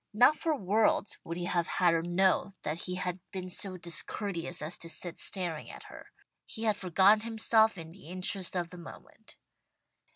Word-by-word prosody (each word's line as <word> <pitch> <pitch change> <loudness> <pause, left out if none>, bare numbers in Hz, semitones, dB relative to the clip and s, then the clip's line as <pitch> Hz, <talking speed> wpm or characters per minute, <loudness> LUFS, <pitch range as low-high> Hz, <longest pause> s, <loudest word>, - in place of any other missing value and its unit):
Not 250 +7 +6
for 315 0 0
worlds 210 -1 +1
would 170 +1 -5
he 175 - -3
have 175 -1 0
had 175 -2 +3
her 165 - +2
know 190 +3 +1
that 155 +3 -3
he 180 - -3
had 180 0 -3
been 185 -2 -6
so 185 0 -1
discourteous 175 0 -3
as 155 +3 -1
to 165 - -7
sit 170 +1 -2
staring 175 -5 0
at - - -10
her. - - -12 0.4
He 220 - -6
had 215 -2 +2
forgotten 195 +2 +4
himself 220 -1 +2
in 165 -1 -8
the 185 -2 -15
interest 185 +1 -1
of 175 -1 -2
the 180 - -10
moment. 170 - -13
185 Hz, 185 wpm, -30 LUFS, 170-205 Hz, 0.4 s, Not